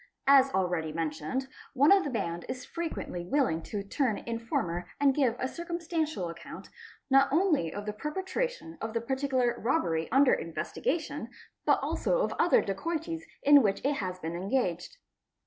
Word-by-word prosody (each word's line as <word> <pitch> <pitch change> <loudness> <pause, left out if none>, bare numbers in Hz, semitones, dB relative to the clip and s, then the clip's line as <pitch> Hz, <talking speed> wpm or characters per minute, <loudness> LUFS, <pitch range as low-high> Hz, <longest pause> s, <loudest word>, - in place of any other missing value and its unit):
As 275 -1 +7
already 175 -4 0
mentioned, 160 - -3 0.3
one 285 +5 +5
of 395 -1 +6
the - - -2
band 170 -9 -3
is 255 0 -5
frequently 325 - -4
willing 180 - +1
to 200 +4 -5
turn 225 +2 0
informer 180 -7 -3
and 280 -1 +4
give 260 -5 +2
a 260 - -1
circumstantial 330 - -3
account, 170 0 -9 0.4
not 270 0 +5
only 310 - +2
of 205 +3 -6
the 210 - -3
perpetration 370 - -3
of 220 0 -4
the 230 - +1
particular 260 -1 0
robbery 170 - 0
under 270 0 +5
investigation, 290 - -2 0.4
but - - +5
also - - +1
of - - -1
other 350 - +4
dacoities 325 - -3 0.2
in 290 0 +8
which 200 -4 +1
it 285 0 +1
has 185 -2 -3
been 165 -1 -5
engaged. 190 - -1
260 Hz, 155 wpm, -29 LUFS, 185-300 Hz, 0.4 s, in